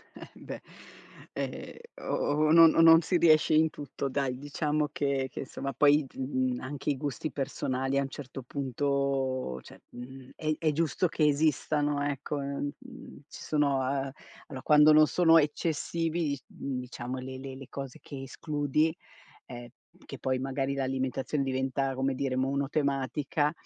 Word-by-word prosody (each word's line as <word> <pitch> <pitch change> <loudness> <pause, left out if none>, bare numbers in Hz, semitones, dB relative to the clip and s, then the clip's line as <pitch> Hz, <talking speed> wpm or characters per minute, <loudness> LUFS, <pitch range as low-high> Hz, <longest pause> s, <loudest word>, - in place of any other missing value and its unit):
Eh - - -11
beh, - - -9 0.7
ehm, - - -5 0.3
o 150 +1 +1
o - - +3
non 165 0 +8
o 165 - +6
non 165 0 +8
si 175 +2 +1
riesce 155 -2 +5
in 155 +1 +5
tutto 140 -1 -5
dai, 130 -2 -1
diciamo 150 +1 -1
che 140 -2 -1
che - - -6
insomma 135 0 -5
poi 145 +3 +4
d - - -18
mhmm, 130 -1 -1
anche 140 +2 -4
i 140 - 0
gusti 145 +1 -4
personali 135 -1 -2
a - - +3
un 135 - -3
certo 135 -1 -8
punto, 135 - -1
cioè, - - -15
mhmm, 130 +1 -10
è 155 -1 -2
è 155 -2 +1
giusto 165 +3 +1
che 155 -1 +1
esistano 145 0 +1
ecco, 145 +1 -3
uhm, 140 +1 -3
mhmm, 255 - -12
ci - - -11
sono 145 -3 +1
uhm, 135 +1 -1 0.4
allora 130 -2 -7
quando 150 0 +6
non 155 0 +7
sono 165 -2 +5
eccessivi 160 +1 0
i 140 - -5
mhmm, 135 -2 -5
diciamo 125 0 -6
le 130 0 -7
le 135 0 -7
le 135 -1 -10
cose 135 -2 -7
che 135 -2 -8
escludi 150 +3 -1 0.5
ehm, 120 -1 -9 0.2
p - - -23
che - - -9
poi 130 -1 0
magari 135 +1 -2
l'alimentazione 135 +1 -1
diventa, 135 0 -1
come 135 +1 0
dire, 130 0 -2
monotematica, 140 +2 0
140 Hz, 165 wpm, -29 LUFS, 130-150 Hz, 0.7 s, non